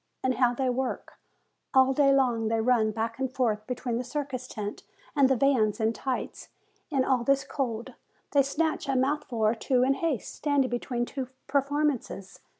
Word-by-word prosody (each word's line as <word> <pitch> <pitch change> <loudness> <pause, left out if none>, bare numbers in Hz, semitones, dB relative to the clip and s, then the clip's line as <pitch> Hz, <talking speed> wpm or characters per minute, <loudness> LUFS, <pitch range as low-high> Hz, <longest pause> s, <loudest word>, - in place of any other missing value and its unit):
And 260 0 +2
how 245 -1 +3
they 265 +1 0
work! 255 +1 -3 0.6
All 265 0 +6
day 275 0 +4
long 245 -5 +2
they 225 0 +1
run 225 -1 +3
back 225 +2 -3
and 265 -1 -1
forth 220 -5 -1
between 245 -1 -2
the - - -2
circus 255 -1 -4
tent 210 -3 -5 0.3
and 275 -2 +5
the 265 - +4
vans, 240 -4 +2
in 220 0 +1
tights, 260 +1 -4 0.4
in 270 -4 +1
all 255 -3 +2
this 275 +2 +2
cold; 235 -5 -3 0.4
they 285 - +5
snatch 305 +1 -1
a 270 - +1
mouthful 260 -4 0
or 215 - +4
two 250 +2 +1
in 265 +1 +3
haste, 290 -5 -2
standing, 285 -4 +1
between 240 0 -2
two 265 0 -5 0.2
performances. 280 -8 -1
255 Hz, 175 wpm, -28 LUFS, 230-275 Hz, 0.6 s, All